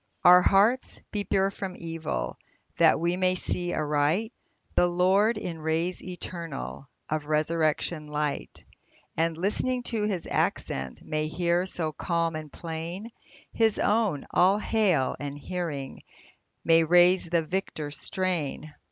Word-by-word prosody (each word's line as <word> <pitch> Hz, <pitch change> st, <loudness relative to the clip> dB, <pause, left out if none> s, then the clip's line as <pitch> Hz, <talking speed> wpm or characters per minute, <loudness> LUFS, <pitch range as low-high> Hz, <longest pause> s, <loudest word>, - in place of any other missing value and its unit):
Our 180 Hz, +1 st, +9 dB
hearts 210 Hz, +8 st, +3 dB
be 205 Hz, -1 st, -2 dB
pure 195 Hz, 0 st, +2 dB
from 195 Hz, -2 st, -6 dB
evil, 165 Hz, -, -4 dB, 0.4 s
That -, -, +5 dB
we 170 Hz, +2 st, 0 dB
may 185 Hz, 0 st, +2 dB
see 175 Hz, -1 st, -2 dB
aright 155 Hz, +9 st, 0 dB, 0.4 s
The 175 Hz, -, +4 dB
Lord 190 Hz, +6 st, +3 dB
in 175 Hz, -5 st, -5 dB
rays 165 Hz, +3 st, -1 dB
eternal 170 Hz, -6 st, -6 dB, 0.2 s
Of 155 Hz, -1 st, -2 dB
resurrection 155 Hz, 0 st, 0 dB
light; 150 Hz, -1 st, -3 dB, 0.5 s
And, 165 Hz, 0 st, 0 dB
listening 245 Hz, +7 st, -1 dB
to 215 Hz, -2 st, +1 dB
His 190 Hz, -5 st, -2 dB
accents, 65 Hz, -1 st, -2 dB
May 155 Hz, 0 st, -1 dB
hear, 175 Hz, +2 st, 0 dB
so 160 Hz, -4 st, -1 dB
calm 165 Hz, +1 st, -1 dB
and 155 Hz, -2 st, -6 dB
plain, 170 Hz, +6 st, -6 dB, 0.4 s
His 225 Hz, -2 st, +2 dB
own 205 Hz, -9 st, +1 dB
" -, -, -19 dB
All 190 Hz, +3 st, +4 dB
hail! 205 Hz, -, +1 dB
" -, -, -36 dB
and, 145 Hz, 0 st, -5 dB
hearing, 145 Hz, -4 st, -5 dB, 0.6 s
May 165 Hz, 0 st, +5 dB
raise 175 Hz, +3 st, +5 dB
the 170 Hz, -1 st, +1 dB
victor 160 Hz, -4 st, -3 dB
strain. 155 Hz, -3 st, -3 dB
170 Hz, 135 wpm, -27 LUFS, 155-190 Hz, 0.6 s, Our